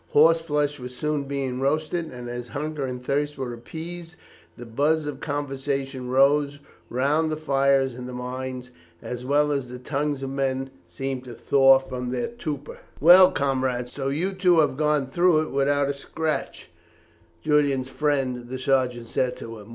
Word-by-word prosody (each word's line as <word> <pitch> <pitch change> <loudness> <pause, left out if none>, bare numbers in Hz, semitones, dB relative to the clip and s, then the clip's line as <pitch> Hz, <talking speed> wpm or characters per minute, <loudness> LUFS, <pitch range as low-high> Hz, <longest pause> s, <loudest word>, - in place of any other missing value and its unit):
Horse 165 +2 +6
flesh 150 -2 -1
was 125 0 -8
soon 150 0 -1
being 135 -2 -3
roasted, 155 +4 -1
and 125 -1 -8
as 120 0 -5
hunger 150 -1 -3
and 125 -1 -4
thirst 145 +3 -1
were 130 -3 -4
appeased, 165 +8 -8 0.4
the 120 - -8
buzz 145 +7 +1
of 145 -2 -5
conversation 135 -2 -3
rose 140 +2 +3 0.3
round 150 +6 +1
the 155 - -2
fires, 135 -3 +2
and 125 +1 -7
the - - -7
minds 125 0 -5 0.3
as 125 0 -5
well 150 +1 +3
as 135 -3 -2
the 125 - -7
tongues 140 +2 -2
of 135 - -4
men 135 -1 -1 0.2
seemed 130 +8 -4
to 120 -2 -9
thaw 135 +1 +5
from 130 -2 -5
their 125 -1 -2
torpor. 150 - -6 0.2
"Well, 180 +4 +9
comrade, 130 -3 -1
so 135 +1 -4
you 165 +8 -1
too 180 -2 +3
have 145 -3 +1
gone 150 -1 +1
through 170 +3 +3
it - - -7
without 140 +1 +2
a 140 - 0
scratch," 155 +3 -4 0.7
Julian's 140 -3 +2
friend, 130 -5 -1
the 130 - -4
sergeant, 130 -2 0
said 125 +2 -1
to 115 -1 -8
him. 105 +1 -13
135 Hz, 170 wpm, -25 LUFS, 130-150 Hz, 0.7 s, Well